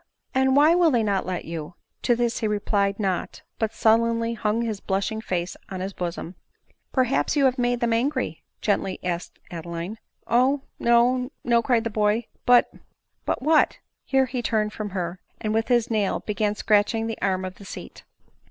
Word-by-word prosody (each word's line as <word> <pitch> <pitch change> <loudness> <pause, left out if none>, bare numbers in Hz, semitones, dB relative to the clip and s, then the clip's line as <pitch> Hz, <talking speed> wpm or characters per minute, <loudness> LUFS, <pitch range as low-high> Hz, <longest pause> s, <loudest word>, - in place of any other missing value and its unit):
and 265 0 +3
why 300 +3 +6
will 345 -1 +5
they 240 -6 +2
not 200 -3 0
let 180 -2 -3
you 165 0 -6
?" - - -53
To 240 - +6
this 235 -1 0
he 220 - 0
replied 205 -1 0
not; 190 -4 -2 0.2
but 220 -1 0
sullenly 230 +1 +2
hung 220 +1 0
his 220 -3 -3
blushing 200 +4 -2
face 180 -4 -2
on 190 - -5
his 190 +2 -4
bosom. 175 -1 -4 0.6
"Perhaps 260 +3 +1
you 285 -2 +4
have 260 0 +2
made 245 0 +1
them 235 -1 +2
angry?" 255 - -1 0.2
gently 195 -2 0
ask 175 -1 -3 0.2
ed 175 - -5
Adeline. 170 +6 -6 0.2
" - - -43
Oh 265 +4 +3
\ - - -49
no, 245 +2 +3
no," 235 -1 +3
cried 230 -1 +2
the 230 - -3
boy; 210 +2 +1
" - - -40
but 245 0 +6 0.2
" - - -49
" - - -49
But - - -1
what 310 +1 +4
?" - - -56
Here 265 -1 +2
he 255 0 -3
turned 215 -2 0
from 215 -1 -4
her, 180 -1 -4 0.2
and 215 0 -2
with 225 +1 +1
his 240 -2 +2
nail 210 -3 +1
began 210 0 -1
scratching 210 +2 +2
the 225 -1 -5
arm 190 -1 0
of 185 0 -7
the 200 - -11
seat. - - -9
220 Hz, 205 wpm, -25 LUFS, 195-245 Hz, 0.6 s, why